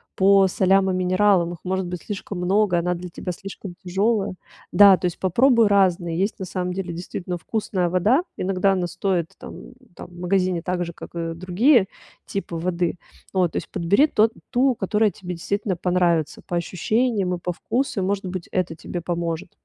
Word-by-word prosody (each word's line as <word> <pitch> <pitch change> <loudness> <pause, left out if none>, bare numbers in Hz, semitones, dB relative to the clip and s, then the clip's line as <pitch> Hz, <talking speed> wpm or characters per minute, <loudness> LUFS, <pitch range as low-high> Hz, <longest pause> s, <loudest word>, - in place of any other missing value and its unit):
по 195 0 +5
солям 190 +1 +3
и 185 - 0
минералам. 185 -1 +2
Их 170 - -11
может 190 0 -1
быть 180 0 -5
слишком 200 -2 -6
много, 185 0 +2
она 180 +1 -1
для 180 +1 -7
тебя 180 +1 -5
слишком 195 0 -9
тяжёлая. 195 +3 0 0.4
Да, 200 -2 +8
то 180 - -4
есть 175 - -2
попробуй 230 +5 +4
разные. 185 -4 +2
Есть 200 +3 -1
на 190 - -4
самом 180 0 -3
деле 185 -1 -4
действительно 175 +1 -5
вкусная 185 -1 -2
вода. 205 - +2
Иногда 195 +1 +1
она 180 -2 0
стоит 175 -2 -1
там - - -11 0.2
там - - -9
в 175 0 -14
магазине 180 -1 0
так 180 -1 -1
же, 170 - -5
как - - -11
и 165 -1 -4
другие 190 - +3 0.4
типы 195 -3 -5
воды. 175 0 -1 0.4
Вот, 180 -3 +1
то - - -4
есть - - -5
подбери 200 - +3
тот 220 -5 +3 0.2
ту, 260 +1 +3
которая 210 0 +1
тебе 180 -2 -7
действительно 200 +3 -2
понравится 175 -3 +1
по 175 - -3
ощущениям 195 +2 0
и - - -8
по 180 0 -3
вкусу. 235 +3 -2
И, - - 0
может 195 +1 -1
быть, 185 -1 -5
это 180 -3 -1
тебе 175 +2 -6
поможет. 170 -1 -3
185 Hz, 185 wpm, -23 LUFS, 175-200 Hz, 0.4 s, Да